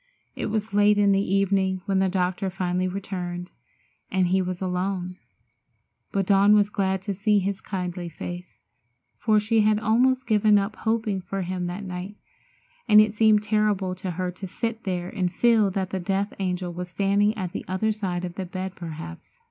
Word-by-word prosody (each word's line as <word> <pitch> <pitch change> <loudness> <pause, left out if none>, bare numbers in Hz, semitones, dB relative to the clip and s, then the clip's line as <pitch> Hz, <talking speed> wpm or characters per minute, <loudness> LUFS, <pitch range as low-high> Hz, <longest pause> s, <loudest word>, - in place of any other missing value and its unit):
It - - -3
was 215 0 -2
late 205 0 +4
in 200 -1 +4
the 195 0 +3
evening 195 -1 +1
when 195 -2 +1
the 190 0 +2
doctor 185 +1 -1
finally 180 0 -1
returned, 180 -2 -5 0.6
and 185 -2 +1
he 190 +1 +3
was 180 -1 -3
alone. 180 0 -2 0.9
But 195 -1 0
Dawn 200 +2 +5
was 205 0 +3
glad 190 -2 0
to 200 - -2
see 210 +2 +2
his 195 0 -1
kindly 180 -2 -4
face, 175 +2 -8 0.6
for 215 -2 +3
she 220 +1 +2
had 210 0 +3
almost 255 +4 +2
given 215 -2 +4
up 200 +2 -1
hoping 220 -3 -1
for 195 +1 -4
him 180 0 -3
that 180 +4 -5
night, 185 +2 -6 0.7
and 210 -2 +8
it 215 0 +4
seemed 215 -1 +4
terrible 210 -3 +1
to 185 +1 -5
her 180 +1 -2
to 185 +2 -8
sit 225 +4 -4
there 180 -2 -2
and 185 -3 -1
feel 225 +1 +3
that 190 -1 -3
the 190 - -2
death 195 +3 -1
angel 180 -2 -2
was 180 +1 -6
standing 205 +3 +1
at 185 -4 -3
the - - -5
other 190 +4 0
side 185 -4 -3
of 175 - -6
the 190 +1 -5
bed, 185 +1 -5
perhaps. 170 - -9
195 Hz, 185 wpm, -25 LUFS, 180-210 Hz, 0.9 s, and